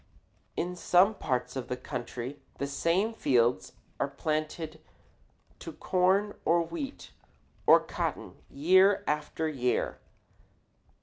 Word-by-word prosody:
In 180 Hz, +1 st, -2 dB
some 180 Hz, +4 st, +4 dB
parts 125 Hz, -9 st, -2 dB
of 130 Hz, -2 st, -4 dB
the 125 Hz, -, -3 dB
country 125 Hz, +1 st, -6 dB, 0.2 s
the 140 Hz, -, -2 dB
same 170 Hz, +10 st, 0 dB
fields 120 Hz, -, +1 dB, 0.3 s
are -, -, +1 dB
planted 155 Hz, 0 st, -3 dB, 0.8 s
to -, -, -8 dB
corn 190 Hz, +3 st, +2 dB
or 170 Hz, +1 st, +3 dB
wheat 170 Hz, -, -7 dB, 0.6 s
or -, -, +9 dB
cotton -, -, -4 dB, 0.2 s
year 185 Hz, +7 st, +4 dB
after 150 Hz, +1 st, -1 dB
year. 125 Hz, -5 st, -1 dB
155 Hz, 110 wpm, -29 LUFS, 130-180 Hz, 0.8 s, or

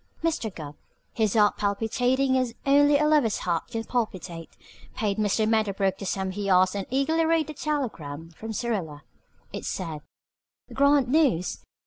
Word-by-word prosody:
Mr. 320 Hz, -9 st, 0 dB
Gubb, 150 Hz, -3 st, -7 dB, 0.4 s
his 220 Hz, -3 st, 0 dB
heart 210 Hz, -2 st, +4 dB
palpitating 245 Hz, +6 st, +1 dB
as 255 Hz, -3 st, 0 dB
only 285 Hz, +1 st, +5 dB
a 300 Hz, -, +2 dB
lover's 295 Hz, -8 st, +3 dB
heart 170 Hz, -2 st, -1 dB
can 225 Hz, 0 st, -4 dB
palpitate, 185 Hz, -9 st, -4 dB, 0.5 s
paid 210 Hz, -3 st, -1 dB
Mr. 215 Hz, +1 st, +1 dB
Medderbrook 200 Hz, -3 st, +1 dB
the 195 Hz, -, -5 dB
sum 190 Hz, 0 st, -2 dB
he 200 Hz, +1 st, -3 dB
asked 185 Hz, +1 st, +4 dB
and 200 Hz, -1 st, -3 dB
eagerly 280 Hz, +5 st, +1 dB
read 325 Hz, -1 st, +2 dB
the 305 Hz, -, -7 dB
telegram 170 Hz, -, -4 dB
from 220 Hz, +7 st, -8 dB
Syrilla. 195 Hz, -11 st, -3 dB, 0.5 s
It -, -, -5 dB
said: 160 Hz, -5 st, -4 dB, 0.7 s
Grand 280 Hz, -1 st, +4 dB
news! 255 Hz, -, +2 dB
220 Hz, 150 wpm, -26 LUFS, 190-275 Hz, 0.7 s, only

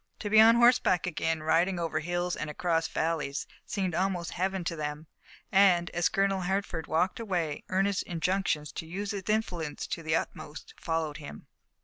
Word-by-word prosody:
To 205 Hz, -, -5 dB
be 215 Hz, -, +7 dB
on 225 Hz, +1 st, +8 dB
horseback 235 Hz, -7 st, +4 dB
again, 160 Hz, -2 st, -1 dB
riding 175 Hz, +4 st, +2 dB
over 165 Hz, -2 st, -1 dB
hills 175 Hz, +2 st, -2 dB
and 155 Hz, -, -4 dB
across 165 Hz, +1 st, 0 dB
valleys, 155 Hz, -3 st, -2 dB, 0.2 s
seemed 190 Hz, -4 st, -2 dB
almost 180 Hz, -1 st, -1 dB
Heaven 190 Hz, +1 st, -1 dB
to 170 Hz, 0 st, -2 dB
them, 150 Hz, 0 st, -4 dB, 0.5 s
and, 185 Hz, -3 st, +4 dB
as 175 Hz, +1 st, +1 dB
Colonel 195 Hz, -2 st, +1 dB
Hertford 185 Hz, -3 st, -2 dB
walked 180 Hz, +6 st, +1 dB
away, 175 Hz, -9 st, -2 dB
earnest 195 Hz, +1 st, +1 dB
injunctions 175 Hz, -3 st, -1 dB
to 160 Hz, -, -6 dB
use 195 Hz, +4 st, -4 dB
his 200 Hz, -2 st, -3 dB
influence 180 Hz, -8 st, -1 dB
to -, -, -4 dB
the 155 Hz, 0 st, 0 dB
utmost 150 Hz, -1 st, -5 dB
followed 160 Hz, -2 st, -2 dB
him. 145 Hz, -2 st, -10 dB
175 Hz, 165 wpm, -29 LUFS, 160-195 Hz, 0.5 s, on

